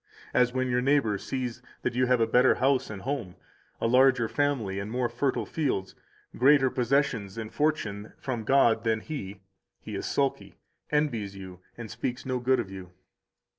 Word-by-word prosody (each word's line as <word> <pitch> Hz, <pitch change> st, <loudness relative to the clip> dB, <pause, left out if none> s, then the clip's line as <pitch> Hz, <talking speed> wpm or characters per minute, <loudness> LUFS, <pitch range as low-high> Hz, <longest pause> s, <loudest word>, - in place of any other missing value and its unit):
184 -, -, +3 dB
As 125 Hz, 0 st, +2 dB
when 130 Hz, 0 st, +1 dB
your 125 Hz, 0 st, +2 dB
neighbor 135 Hz, -5 st, +2 dB
sees 125 Hz, -1 st, -4 dB, 0.2 s
that -, -, 0 dB
you 125 Hz, +1 st, +2 dB
have 125 Hz, -1 st, +3 dB
a 115 Hz, -, +4 dB
better 125 Hz, +3 st, +4 dB
house 135 Hz, +1 st, +1 dB
and 100 Hz, -3 st, -7 dB
home 125 Hz, -10 st, -3 dB, 0.4 s
[a -, -, -1 dB
larger 125 Hz, 0 st, +4 dB
family 120 Hz, -9 st, -1 dB
and 100 Hz, +1 st, -5 dB
more 125 Hz, +1 st, 0 dB
fertile 125 Hz, +3 st, -1 dB
fields], 130 Hz, -12 st, -2 dB, 0.4 s
greater 135 Hz, 0 st, +5 dB
possessions 120 Hz, -6 st, 0 dB
and 110 Hz, -1 st, -6 dB
fortune 110 Hz, -9 st, -1 dB
from 120 Hz, -4 st, -4 dB
God 115 Hz, -2 st, +3 dB
than 110 Hz, -1 st, +1 dB
he, 100 Hz, -11 st, -7 dB, 0.4 s
he -, -, -9 dB
is -, -, -3 dB
sulky, 140 Hz, -1 st, -1 dB, 0.3 s
envies 120 Hz, -10 st, 0 dB
you, 95 Hz, -2 st, -10 dB, 0.2 s
and 115 Hz, -3 st, -7 dB
speaks 125 Hz, 0 st, -4 dB
no 130 Hz, -1 st, -1 dB
good 130 Hz, +1 st, +2 dB
of 100 Hz, -5 st, -4 dB
you. 95 Hz, -2 st, -9 dB
125 Hz, 175 wpm, -28 LUFS, 110-135 Hz, 0.4 s, greater